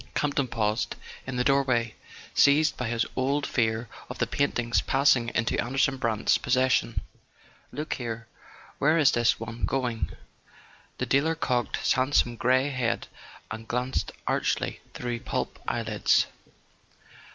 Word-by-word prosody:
Camp 150 Hz, -1 st, +1 dB
ton 140 Hz, -2 st, +1 dB
paused 110 Hz, -1 st, -1 dB, 0.3 s
in 130 Hz, -, -4 dB
the 125 Hz, -, +1 dB
doorway, 130 Hz, -5 st, +2 dB, 0.4 s
seized 150 Hz, +3 st, +4 dB
by 125 Hz, -, -3 dB
his 115 Hz, 0 st, 0 dB
old 140 Hz, +3 st, 0 dB
fear 115 Hz, -1 st, 0 dB, 0.2 s
of -, -, -6 dB
the -, -, +1 dB
painting's 120 Hz, -4 st, +1 dB
passing 135 Hz, -3 st, +3 dB
into 115 Hz, -, +1 dB
Anderson 135 Hz, +2 st, +1 dB
Brant's 115 Hz, -4 st, +1 dB
possession. 130 Hz, -1 st, +1 dB, 0.7 s
"Look 150 Hz, +1 st, -3 dB
here: 115 Hz, -2 st, -5 dB, 0.5 s
where 155 Hz, +3 st, +4 dB
is 150 Hz, -4 st, +5 dB
this 120 Hz, -1 st, +2 dB
one 115 Hz, +1 st, -7 dB
going?" 125 Hz, -4 st, -1 dB, 0.9 s
The -, -, -1 dB
dealer 155 Hz, +4 st, +2 dB
cocked 125 Hz, -6 st, 0 dB
his -, -, +2 dB
handsome 130 Hz, -2 st, +2 dB
grey 130 Hz, +4 st, +2 dB
head 125 Hz, -3 st, -1 dB, 0.4 s
and 110 Hz, 0 st, -6 dB
glanced 125 Hz, +2 st, -1 dB
archly -, -, 0 dB, 0.2 s
through 120 Hz, -1 st, -3 dB
plump -, -, -3 dB
eyelids. -, -, +2 dB
125 Hz, 135 wpm, -27 LUFS, 115-135 Hz, 0.9 s, is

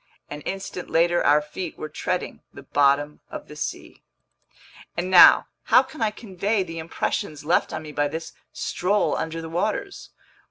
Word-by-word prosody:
An 150 Hz, 0 st, -6 dB
instant 195 Hz, -2 st, -5 dB
later 175 Hz, +1 st, +2 dB
our 150 Hz, +1 st, +4 dB
feet 160 Hz, +3 st, -7 dB
were 155 Hz, -, -5 dB
treading 150 Hz, -, -3 dB
the -, -, -12 dB
bottom 145 Hz, +1 st, +2 dB
of -, -, -8 dB
the 150 Hz, -, -11 dB
sea. 150 Hz, -, -6 dB, 1.0 s
And 180 Hz, +2 st, -2 dB
now, 180 Hz, -, +9 dB, 0.2 s
how -, -, +6 dB
can 310 Hz, -, -12 dB
I 220 Hz, -, +3 dB
convey 205 Hz, -1 st, -2 dB
the 165 Hz, -2 st, -7 dB
impressions 155 Hz, -2 st, -3 dB
left 170 Hz, -, +2 dB
on 155 Hz, -1 st, -5 dB
me 155 Hz, -, -8 dB
by 145 Hz, 0 st, 0 dB
this 160 Hz, +3 st, -6 dB, 0.2 s
stroll 200 Hz, +4 st, 0 dB
under 160 Hz, 0 st, -3 dB
the -, -, -6 dB
waters. 210 Hz, -, -3 dB
165 Hz, 165 wpm, -24 LUFS, 150-185 Hz, 1.0 s, now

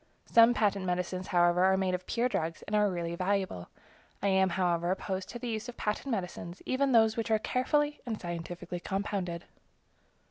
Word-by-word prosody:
Some 230 Hz, +1 st, +6 dB
patent 200 Hz, -3 st, +1 dB
medicines, 180 Hz, 0 st, -2 dB
however, 175 Hz, 0 st, +3 dB
are 190 Hz, 0 st, +4 dB
made 190 Hz, -1 st, 0 dB
of 180 Hz, 0 st, -3 dB
pure 240 Hz, +1 st, +1 dB
drugs, 165 Hz, -9 st, -3 dB
and 210 Hz, -, -3 dB
are 210 Hz, -1 st, +4 dB
really 170 Hz, -2 st, -3 dB
valuable. 185 Hz, -, -1 dB, 0.5 s
I 200 Hz, -, +1 dB
am, 190 Hz, 0 st, +3 dB
however, 175 Hz, -1 st, 0 dB
opposed 190 Hz, 0 st, -2 dB
to 240 Hz, -, -6 dB
the 245 Hz, +1 st, -6 dB
use 220 Hz, +2 st, -3 dB
of 245 Hz, -, -9 dB
patent 210 Hz, +6 st, -2 dB
medicines, 180 Hz, -5 st, -4 dB
even 270 Hz, +2 st, +1 dB
of -, -, +1 dB
those 220 Hz, -1 st, +5 dB
which 225 Hz, -1 st, -2 dB
are 220 Hz, -, +4 dB
carefully 295 Hz, +6 st, 0 dB
and 230 Hz, -4 st, -4 dB
scientifically 175 Hz, 0 st, -5 dB
compounded. 190 Hz, -3 st, -3 dB
190 Hz, 185 wpm, -30 LUFS, 180-220 Hz, 0.5 s, Some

